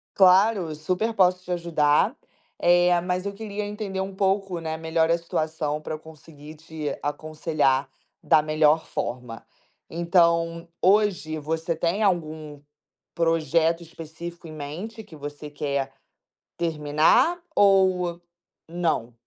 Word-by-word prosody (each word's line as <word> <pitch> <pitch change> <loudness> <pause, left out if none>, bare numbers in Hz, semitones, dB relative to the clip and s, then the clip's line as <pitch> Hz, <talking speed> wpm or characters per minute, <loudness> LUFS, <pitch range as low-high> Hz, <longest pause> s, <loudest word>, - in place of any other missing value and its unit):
Claro, 190 -3 +4
super 185 +9 -1
posso 180 -3 +3
te 180 - -6
ajudar. 170 - +2 0.4
Eh, 175 0 +4
mas 180 +1 -2
eu 200 - -3
queria 210 0 -5
entender 205 -2 -4
um 190 +1 -4
pouco, 195 -2 0
né, 160 -1 -4
melhor 160 0 +1
a 170 - +3
situação 155 -2 -2
pra 155 - -4
eu - - -10
conseguir 155 -1 -13
te 160 -1 -5
aconselhar 145 -2 0 0.3
da 155 - +4
melhor 155 +1 +3
forma. 120 -2 -5 0.5
Então, 170 -1 +2
hoje 185 -6 +2
você 160 +2 -2
tem 170 +6 0
algum 155 -6 -2 0.5
projeto 165 0 +2
específico 165 +1 -9
em 155 - -9
mente 170 +10 -7
que 165 - -14
você 145 0 -8
quer 140 -2 -2 0.7
terminar 160 - +2 0.2
ou 185 -3 +3 0.5
não? 165 -8 -1
165 Hz, 120 wpm, -25 LUFS, 155-180 Hz, 0.7 s, Claro